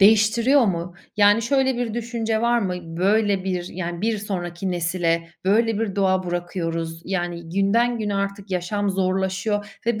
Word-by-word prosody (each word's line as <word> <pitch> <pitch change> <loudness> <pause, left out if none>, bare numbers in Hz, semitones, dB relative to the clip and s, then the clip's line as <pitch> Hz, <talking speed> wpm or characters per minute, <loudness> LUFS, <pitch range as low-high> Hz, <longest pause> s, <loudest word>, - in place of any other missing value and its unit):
değiştiriyor 225 +6 +5
mu? 175 -1 -2 0.2
Yani 205 +2 +5
şöyle 265 0 +2
bir 240 -3 -2
düşünce 230 -2 -1
var 240 0 +3
mı: 190 -5 -1 0.2
Böyle 200 +1 +2
bir, 180 -2 -2
yani 175 -1 -5
bir 220 0 0
sonraki 185 -2 -4
nesle 170 -1 0 0.2
böyle 220 +2 +3
bir 205 -3 -2
doğa 190 -1 +2
bırakıyoruz, 170 -2 -3
yani 175 -3 -3
günden 225 +6 +2
güne 210 -2 -2
artık 200 0 -3
yaşam 195 +3 -1
zorlaşıyor 190 +2 -1
ve 235 -2 +1
195 Hz, 150 wpm, -23 LUFS, 175-220 Hz, 0.2 s, değiştiriyor